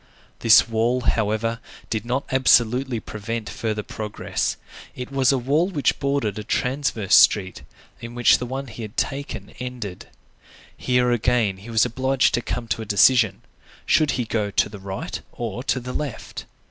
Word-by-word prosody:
This 115 Hz, 0 st, +6 dB
wall, 115 Hz, +3 st, +1 dB
however, 115 Hz, 0 st, 0 dB, 0.3 s
did 110 Hz, 0 st, -2 dB
not 125 Hz, +4 st, -1 dB
absolutely 125 Hz, -1 st, +3 dB
prevent 110 Hz, +1 st, -5 dB
further 110 Hz, -2 st, -3 dB
progress; 105 Hz, 0 st, -3 dB, 0.4 s
it 125 Hz, +1 st, -7 dB
was 135 Hz, -1 st, +3 dB
a 135 Hz, -, +2 dB
wall 145 Hz, +8 st, +1 dB
which 160 Hz, -8 st, 0 dB
bordered 140 Hz, -7 st, -1 dB
a -, -, -5 dB
transverse 125 Hz, -4 st, -1 dB
street, 100 Hz, -2 st, +5 dB, 0.4 s
in 115 Hz, +1 st, -8 dB
which 120 Hz, -1 st, +4 dB
the 125 Hz, -, -4 dB
one 135 Hz, +2 st, -4 dB
he 115 Hz, -2 st, -10 dB
had 110 Hz, +1 st, -8 dB
taken 140 Hz, +1 st, -3 dB
ended. 125 Hz, -7 st, -6 dB, 0.7 s
Here 125 Hz, -1 st, +1 dB
again, 120 Hz, -4 st, +1 dB
he 100 Hz, +5 st, -12 dB
was 115 Hz, 0 st, +3 dB
obliged 130 Hz, +2 st, +1 dB
to 120 Hz, -, +1 dB
come 120 Hz, 0 st, -4 dB
to -, -, -1 dB
a -, -, -3 dB
decision; 105 Hz, 0 st, +4 dB, 0.4 s
should 155 Hz, -2 st, +3 dB
he 125 Hz, -, -1 dB
go 105 Hz, -2 st, -1 dB
to 100 Hz, -, +1 dB
the 100 Hz, -1 st, -10 dB
right 95 Hz, 0 st, -5 dB
or 120 Hz, 0 st, -5 dB
to 130 Hz, -, +1 dB
the 125 Hz, 0 st, -7 dB
left. 140 Hz, -7 st, -5 dB
120 Hz, 165 wpm, -23 LUFS, 110-130 Hz, 0.7 s, This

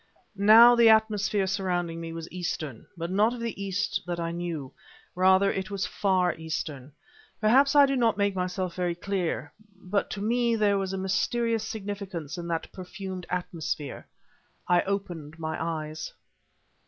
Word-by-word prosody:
Now, 220 Hz, +4 st, +8 dB
the 235 Hz, -1 st, +6 dB
atmosphere 210 Hz, -2 st, +3 dB
surrounding 180 Hz, -4 st, -2 dB
me 165 Hz, 0 st, -6 dB
was 165 Hz, 0 st, -6 dB
Eastern, 155 Hz, -8 st, -5 dB
but 170 Hz, +1 st, -4 dB
not 215 Hz, +5 st, +3 dB
of -, -, -8 dB
the 230 Hz, -4 st, -4 dB
East 195 Hz, 0 st, -1 dB
that 175 Hz, -1 st, -3 dB
I 165 Hz, 0 st, -2 dB
knew; 170 Hz, -6 st, -5 dB, 0.4 s
rather 190 Hz, +2 st, +4 dB
it 190 Hz, +1 st, -3 dB
was 200 Hz, -2 st, -2 dB
Far 185 Hz, -3 st, +1 dB
Eastern. 150 Hz, -4 st, -5 dB, 0.5 s
Perhaps 265 Hz, +6 st, +4 dB
I 285 Hz, -1 st, +8 dB
do 275 Hz, 0 st, 0 dB
not 230 Hz, -5 st, +2 dB
make 200 Hz, -1 st, +1 dB
myself 180 Hz, -1 st, -2 dB
very 175 Hz, -1 st, -1 dB
clear, 185 Hz, -1 st, -3 dB, 0.2 s
but 190 Hz, +1 st, -2 dB
to 200 Hz, -, -5 dB
me 235 Hz, +2 st, +1 dB
there 205 Hz, -2 st, +2 dB
was 190 Hz, -1 st, -2 dB
a 195 Hz, -, -3 dB
mysterious 225 Hz, +4 st, 0 dB
significance 200 Hz, -, -5 dB
in 175 Hz, -1 st, -6 dB
that 165 Hz, -1 st, -3 dB
perfumed 185 Hz, -1 st, -7 dB
atmosphere. 165 Hz, -5 st, -4 dB, 0.6 s
I 175 Hz, -1 st, +4 dB
opened 175 Hz, -6 st, -4 dB
my 160 Hz, 0 st, -3 dB
eyes. 155 Hz, -1 st, -4 dB
190 Hz, 155 wpm, -27 LUFS, 170-205 Hz, 0.6 s, Now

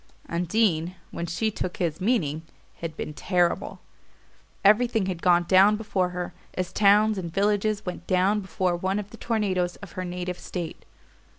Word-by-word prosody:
Undine, 175 Hz, 0 st, +1 dB, 0.2 s
when 170 Hz, -, -4 dB
she 215 Hz, +6 st, -1 dB
took 185 Hz, -3 st, -4 dB
his 170 Hz, -3 st, -2 dB
meaning, 175 Hz, -, +1 dB, 0.4 s
had 165 Hz, -1 st, -6 dB
been 150 Hz, -, -4 dB
terrible. 175 Hz, +3 st, 0 dB, 0.8 s
Everything 220 Hz, 0 st, +4 dB
had 180 Hz, -3 st, -3 dB
gone 175 Hz, -1 st, +4 dB
down 190 Hz, +4 st, +5 dB
before 200 Hz, -4 st, -1 dB
her, 180 Hz, 0 st, -5 dB, 0.2 s
as 185 Hz, -1 st, -3 dB
towns 210 Hz, 0 st, +4 dB
and 170 Hz, -3 st, -5 dB
villages 205 Hz, +2 st, +1 dB
went 180 Hz, -2 st, -6 dB
down 190 Hz, +3 st, +3 dB
before 185 Hz, -2 st, -1 dB
one 190 Hz, +3 st, -1 dB
of 205 Hz, -1 st, -5 dB
the 230 Hz, -, -11 dB
tornadoes 190 Hz, -6 st, 0 dB
of 200 Hz, -5 st, -11 dB
her 185 Hz, -, -4 dB
native 180 Hz, 0 st, -4 dB
state. 175 Hz, -3 st, -6 dB
185 Hz, 160 wpm, -26 LUFS, 175-210 Hz, 0.8 s, down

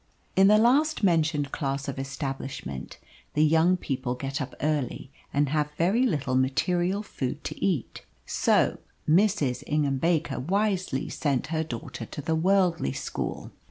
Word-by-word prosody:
In 190 Hz, +1 st, +6 dB
the 210 Hz, +1 st, +6 dB
last 270 Hz, +6 st, +3 dB
mentioned 160 Hz, -5 st, +2 dB
class 140 Hz, -2 st, -2 dB
of 135 Hz, -1 st, -4 dB
establishment 135 Hz, -, -5 dB, 0.4 s
the 150 Hz, +1 st, +5 dB
young 165 Hz, +4 st, +4 dB
people 130 Hz, -6 st, -3 dB
get 135 Hz, +3 st, -4 dB
up 135 Hz, -, -5 dB
early 145 Hz, -3 st, -2 dB, 0.2 s
and 145 Hz, 0 st, +1 dB
have 150 Hz, 0 st, 0 dB
very 210 Hz, +10 st, +3 dB
little 145 Hz, -, -1 dB
material 175 Hz, +9 st, +1 dB
food 145 Hz, -6 st, -4 dB
to -, -, -5 dB
eat. 175 Hz, -11 st, -1 dB, 0.2 s
So -, -, +2 dB, 0.3 s
Mrs. 165 Hz, -, +2 dB
Ingham 145 Hz, -3 st, +1 dB
Baker 165 Hz, +1 st, +1 dB
wisely 185 Hz, -3 st, 0 dB
sent 140 Hz, -4 st, -1 dB
her 160 Hz, 0 st, +1 dB
daughter 120 Hz, -5 st, -6 dB
to -, -, -8 dB
the 160 Hz, -, 0 dB
worldly 175 Hz, -, +2 dB
school. -, -, -4 dB
150 Hz, 145 wpm, -27 LUFS, 135-180 Hz, 0.4 s, In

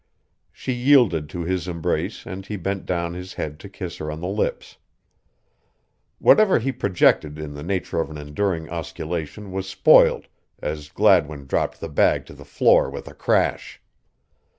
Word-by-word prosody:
She 130 Hz, -, -4 dB
yielded 120 Hz, -, +3 dB
to 85 Hz, +3 st, -5 dB
his 90 Hz, 0 st, -2 dB
embrace 85 Hz, -2 st, -2 dB
and 95 Hz, +1 st, -7 dB
he 105 Hz, -, -6 dB
bent 95 Hz, +1 st, -4 dB
down 85 Hz, -1 st, -1 dB
his 90 Hz, +1 st, -8 dB
head 75 Hz, 0 st, -5 dB
to 100 Hz, -, -10 dB
kiss 90 Hz, -3 st, -7 dB
her 75 Hz, -, -5 dB
on 75 Hz, -, -6 dB
the 90 Hz, -, -4 dB
lips. 100 Hz, +3 st, -3 dB, 1.4 s
Whatever 215 Hz, -3 st, +5 dB
he 135 Hz, +4 st, -1 dB
projected 85 Hz, -, +2 dB
in 75 Hz, -2 st, -6 dB
the 75 Hz, -, -8 dB
nature 90 Hz, +1 st, -2 dB
of -, -, -4 dB
an 75 Hz, -, -8 dB
enduring 80 Hz, +3 st, -2 dB
osculation 85 Hz, +4 st, -5 dB
was 95 Hz, 0 st, -4 dB
spoiled -, -, +5 dB, 0.3 s
as 75 Hz, -1 st, -5 dB
Gladwin 80 Hz, -7 st, +2 dB
dropped 65 Hz, -, -1 dB
the -, -, -5 dB
bag 75 Hz, -, +2 dB
to -, -, -12 dB
the -, -, -13 dB
floor -, -, +3 dB
with -, -, -8 dB
a -, -, -9 dB
crash. -, -, 0 dB
85 Hz, 165 wpm, -23 LUFS, 75-95 Hz, 1.4 s, Whatever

